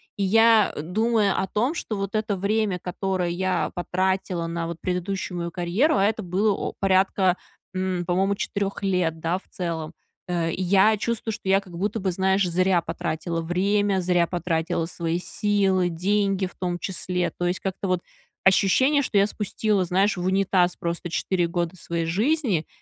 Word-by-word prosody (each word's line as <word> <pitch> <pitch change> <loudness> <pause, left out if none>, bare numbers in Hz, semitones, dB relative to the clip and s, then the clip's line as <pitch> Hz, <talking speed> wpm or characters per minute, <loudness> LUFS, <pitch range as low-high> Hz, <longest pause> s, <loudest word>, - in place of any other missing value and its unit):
И 200 - -5
я, 225 +1 +5
думая 210 +5 +1
о 190 - -1
том, 240 +10 0
что 235 -10 -4
вот 195 0 -3
это 215 -1 0
время, 205 0 0
которое 185 0 -2
я 185 +1 -1
потратила 185 -1 -1
на 165 0 -3
вот 170 -1 -5
предыдущую 180 0 -3
мою 170 - -3
карьеру, 185 - +1
а 195 - +3
это 220 +1 0
было 195 +4 +1
о - - -4
порядка, 190 -1 +3 0.4
м, 185 -1 -2
по-моему, 190 +3 +1
4 200 0 -3
лет, 180 -4 0
да, 170 +3 -1
в - - -29
целом. 165 -3 -4 0.3
Э, 170 -2 0
я 195 +4 +4
чувствую, 225 +1 -2
что 195 - -5
я 195 0 +5
как 185 -3 -13
будто 205 +6 -2
бы, 190 -2 0
знаешь, 190 +1 +2
зря 180 0 +2
потратила 165 +1 -3
время, 195 +3 +1
зря 175 -1 +2
потратила 170 -1 -1
свои 165 0 -2
силы, 190 -1 +1
деньги 195 +3 0
в 185 - -8
том 175 -1 -2
числе. 180 -1 -2
То 175 - -2
есть 180 +1 -1
как-то 195 0 -3
вот 185 -1 0 0.4
ощущение, 260 +10 +4
что 230 -6 -1
я 200 - +5
спустила, 210 -1 -1
знаешь, 190 +4 +2
в 175 - -3
унитаз 185 -1 +2
просто 170 0 -3
4 175 +1 0
года 170 +1 -2
своей 170 -2 -3
жизни. 215 - +1
185 Hz, 170 wpm, -24 LUFS, 175-200 Hz, 0.4 s, я